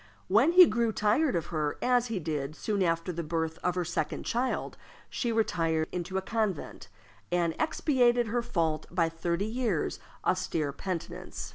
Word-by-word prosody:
When 230 - +4
he 365 0 +10
grew 235 -3 +1
tired 215 - +2
of 165 - -1
her, 150 -2 -1
as 245 -1 +2
he 225 -3 -2
did 155 -3 -3
soon 205 +3 -1
after 165 0 +1
the 170 0 -3
birth 160 0 -2
of 180 0 -1
her 180 -1 -1
second 175 - -2
child, 245 +2 -1 0.4
she 240 - -1
retired 165 -8 +1
into 180 +2 -3
a 190 - -1
convent, 215 -6 -2 0.4
and 170 -2 +1
expiated 245 -6 +2
her 235 +2 0
fault 165 -9 -1
by 170 -2 +1
thirty 170 +3 -2
years' 220 -6 -1 0.3
austere 150 -4 0
penitence. 185 0 -5
185 Hz, 160 wpm, -29 LUFS, 165-235 Hz, 0.4 s, he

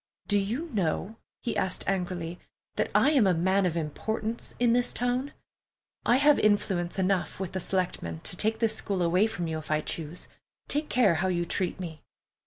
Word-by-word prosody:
"Do 205 -1 +3
you 235 +12 -2
know," 195 +3 -1 0.3
he 235 - -2
asked 185 -1 -1
angrily, 180 -3 -2 0.4
"that - - 0
I 285 - +5
am 260 -9 +4
a 180 - +3
man 190 +3 +2
of 170 -1 -2
importance 220 +8 -3
in 240 -1 +3
this 245 0 +3
town? 250 +3 -1 0.8
I 240 - +6
have 290 +2 +5
influence 195 -4 +1
enough 190 -1 0
with 190 -2 -3
the 190 - -3
selectmen 170 - -2
to - - 0
take 220 +4 0
this 220 -1 +2
school 195 -4 -1
away 180 +5 +3
from 175 -6 -4
you 160 -1 -2
if 155 - -12
I 155 0 +2
choose. 160 +2 -4 0.4
Take 300 +1 0
care 225 -8 +4
how 190 - +1
you 175 -2 0
treat 185 +1 -1
me!" 165 -4 -6
190 Hz, 190 wpm, -28 LUFS, 175-225 Hz, 0.8 s, I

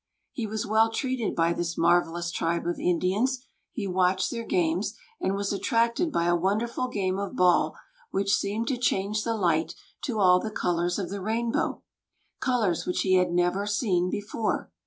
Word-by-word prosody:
He 230 -3 -4
was 215 0 -3
well 220 +2 +3
treated 255 -1 -2
by 165 0 +2
this 170 -1 -3
marvellous 170 0 +2
tribe 170 0 -1
of 175 - -2
Indians; 205 +9 0 0.3
he 215 - -4
watched 185 0 +1
their 230 -1 -4
games, 180 +3 0 0.2
and 195 - 0
was 200 0 -1
attracted 235 - +1
by 170 - +1
a 175 0 +3
wonderful 215 +8 0
game 195 -5 -1
of 200 -1 -4
ball 180 -1 +3 0.3
which 195 0 0
seemed 210 +3 0
to 265 - 0
change 210 -2 0
the 230 -1 -1
light 165 -4 +1 0.3
to 240 -4 -2
all 180 -2 +6
the 220 - -4
colors 175 -3 0
of 190 -3 -4
the 200 -1 -4
rainbow, 230 +3 -1 0.6
colors 225 -9 0
which 180 - 0
he 185 - +2
had 180 -1 +3
never 180 +3 +1
seen 190 -4 +1
before. 205 +2 -2
195 Hz, 175 wpm, -27 LUFS, 175-220 Hz, 0.6 s, all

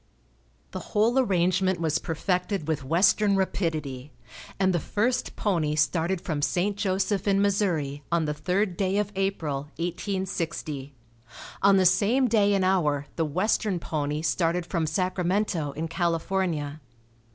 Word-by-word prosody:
The - - -5
whole 230 +5 +1
arrangement 185 -4 +2
was 160 -1 0
perfected 180 +1 -2
with 155 -3 -1
western 195 +7 +3
rapidity, 155 -8 -2 0.5
and 190 -1 +3
the 175 - +1
first 225 - -1
pony 165 -7 0
started 165 +4 +1
from 155 -4 -3
St. 185 +7 0
Joseph 195 0 -1
in 195 -1 +3
Missouri 180 -9 0
on 170 -2 +2
the 150 - -1
third 180 +3 -1
day 195 0 0
of 205 -1 0
April, 160 -8 -2
1860. 170 -6 -3 0.7
On 200 0 +5
the 185 - +3
same 220 +8 +3
day 205 -3 +3
and 190 -1 +1
hour 150 -7 +1
the 165 - 0
western 190 +5 0
pony 150 -1 -2
started 170 +2 0
from 165 -2 -1
Sacramento 180 -1 0
in 160 +3 -3
California. 165 -3 -1
180 Hz, 135 wpm, -26 LUFS, 155-195 Hz, 0.7 s, On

